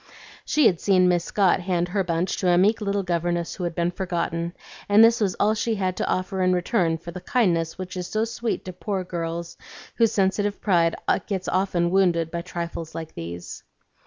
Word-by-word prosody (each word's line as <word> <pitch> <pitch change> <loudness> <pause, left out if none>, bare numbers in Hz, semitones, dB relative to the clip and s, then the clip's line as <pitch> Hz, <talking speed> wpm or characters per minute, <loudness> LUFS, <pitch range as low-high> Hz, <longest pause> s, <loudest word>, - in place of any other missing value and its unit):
She 300 -3 +3
had 175 -6 +3
seen 185 -2 +4
Miss 175 -1 +2
Scott 195 -3 +2
hand 175 -1 -1
her 195 +1 0
bunch 175 +1 -1
to 185 - +1
a 175 - +4
meek 210 +5 +3
little 200 -1 -1
governess 175 -1 -1
who 180 - -4
had 170 -1 -3
been 170 0 0
forgotten, 170 -2 -3 0.3
and 205 +2 +7
this 230 0 +5
was 195 -3 +1
all 210 +1 +2
she 225 +1 -1
had 185 -2 -1
to - - -1
offer 185 +1 -1
in 185 0 +3
return 175 -2 +1
for 170 +1 -9
the 180 - -8
kindness 175 -7 +1
which 185 0 -6
is 180 -1 -4
so 215 +1 0
sweet 230 0 -3
to 185 - -6
poor 190 +1 -3
girls 170 -1 -5 0.4
whose 230 -2 +4
sensitive 200 +1 0
pride 170 -5 +2 0.3
gets 190 -3 -3
often 180 -2 +1
wounded 175 -4 +2
by 170 - -3
trifles 170 -2 -6
like 160 -1 -6
these. 85 +1 -7
180 Hz, 200 wpm, -24 LUFS, 170-200 Hz, 0.4 s, and